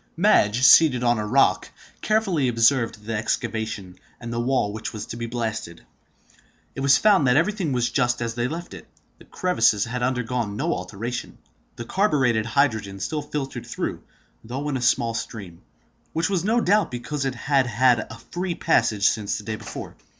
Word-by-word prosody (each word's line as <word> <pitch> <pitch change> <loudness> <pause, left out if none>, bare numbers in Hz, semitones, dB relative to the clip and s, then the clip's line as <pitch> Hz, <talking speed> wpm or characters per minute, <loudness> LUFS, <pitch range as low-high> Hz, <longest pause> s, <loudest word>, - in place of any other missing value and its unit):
Madge, 130 - +3
seated 130 -3 +6
on 120 -2 +2
a 105 - -3
rock, - - +2 0.3
carefully 195 -10 +1
observed 115 -2 +2
the 115 - -3
excavation, 110 -4 -3 0.2
and 115 -1 -6
the 115 - -2
wall 120 -4 0
which 110 +1 -5
was 105 -1 -6
to - - -7
be 115 0 -5
blasted. 110 -8 -5 0.9
It - - -8
was 135 0 +5
found 200 -10 +4
that 125 +2 +4
everything 180 -1 0
was 125 -2 0
just 125 -2 +1
as 115 -1 -3
they 120 +1 -1
left 170 +5 -6
it. - - -11 0.3
The - - -16
crevices 115 - +1
had 125 +2 -4
undergone 125 -4 -1
no 165 +7 0
alteration; 110 +6 -5 0.4
the 120 - -7
carburetted 130 - +1
hydrogen 110 -6 0
still 150 +10 -3
filtered 145 -2 -5
through, - - -4 0.4
though 130 +6 -5
in 140 - -2
a - - -5
small 120 -1 +2
stream, 100 -7 -7 0.5
which 165 +3 0
was 180 -4 0
no 225 +4 +2
doubt 210 +1 +2
because 125 +4 -4
it 135 -2 -2
had 135 +1 +1
had 120 +1 +3
a 115 - -9
free 175 0 -2
passage 105 -12 +2
since 105 -2 -1
the - - -8
day 110 +1 -4
before. 110 0 -8
125 Hz, 180 wpm, -23 LUFS, 110-145 Hz, 0.9 s, seated